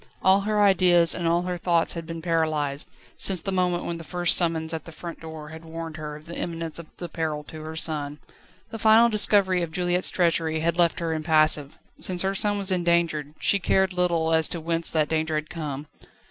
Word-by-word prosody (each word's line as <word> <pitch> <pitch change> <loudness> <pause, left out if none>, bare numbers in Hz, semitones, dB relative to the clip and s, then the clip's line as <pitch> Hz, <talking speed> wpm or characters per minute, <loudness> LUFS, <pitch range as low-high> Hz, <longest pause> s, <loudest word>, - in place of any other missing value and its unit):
All 190 +2 +5
her 210 +1 +1
ideas 175 -4 +5
and 175 -2 -2
all 170 +1 +2
her 180 -1 -4
thoughts 170 -1 +2
had 165 -1 -7
been 165 -1 -7
paralysed, 155 -4 0 0.3
since 190 -2 +3
the 195 - -4
moment 180 -2 0
when 170 -1 -4
the - - -8
first 175 +1 +1
summons 165 -2 0
at 160 - -5
the 165 - -10
front 170 +2 -8
door 160 -2 -9
had 160 +1 -10
warned 165 0 -7
her 150 -1 -6
of 150 +1 -13
the 170 0 -8
imminence 165 -2 -4
of 165 - -10
the 175 - -6
peril 155 -2 -3
to 155 +1 -10
her 160 +1 -7
son. 150 -2 0 0.5
The 225 - -6
final 220 +2 +6
discovery 200 -4 +4
of 170 -2 -3
Juliette's 180 +1 0
treachery 165 -2 0
had 170 +1 +1
left 170 0 +2
her 165 -1 -1
impassive. 155 -2 +2 0.2
Since 180 -1 -2
her 195 +1 0
son 205 +1 0
was 195 -1 -1
in 180 -2 0
danger, 170 -3 +1
she 200 - +2
cared 190 +1 +1
little 170 -3 +1
as 160 0 +4
to 170 - -4
whence 165 +1 -1
that 155 -2 +1
danger 160 0 -1
had 155 0 -3
come. 150 -4 -5
165 Hz, 215 wpm, -25 LUFS, 160-180 Hz, 0.5 s, final